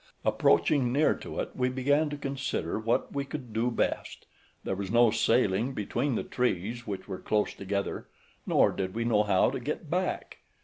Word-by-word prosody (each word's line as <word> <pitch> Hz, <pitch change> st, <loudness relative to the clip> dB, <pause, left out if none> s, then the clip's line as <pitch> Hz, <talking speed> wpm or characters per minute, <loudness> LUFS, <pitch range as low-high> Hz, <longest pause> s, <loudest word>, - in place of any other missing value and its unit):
Approaching 135 Hz, -5 st, +3 dB
near 145 Hz, +4 st, +3 dB
to -, -, -7 dB
it, -, -, -5 dB
we 125 Hz, 0 st, +1 dB
began 145 Hz, +4 st, +2 dB
to 145 Hz, -, -5 dB
consider 135 Hz, -, -2 dB
what 115 Hz, +2 st, 0 dB
we 140 Hz, -1 st, -1 dB
could 135 Hz, -5 st, -7 dB
do 115 Hz, +3 st, +1 dB
best. 120 Hz, -, -2 dB, 0.4 s
There -, -, -2 dB
was 95 Hz, 0 st, -4 dB
no 120 Hz, +1 st, +5 dB
sailing 115 Hz, +2 st, +2 dB
between 120 Hz, +6 st, -1 dB
the -, -, -1 dB
trees, 120 Hz, 0 st, -2 dB
which 100 Hz, -2 st, -5 dB
were 95 Hz, -2 st, -5 dB
close 105 Hz, -1 st, 0 dB
together, 100 Hz, 0 st, -3 dB, 0.4 s
nor -, -, +4 dB
did 95 Hz, 0 st, -4 dB
we 115 Hz, 0 st, -1 dB
know 110 Hz, -3 st, +3 dB
how 100 Hz, -3 st, +3 dB
to -, -, -3 dB
get -, -, -5 dB
back. -, -, -2 dB
120 Hz, 180 wpm, -29 LUFS, 100-130 Hz, 0.4 s, no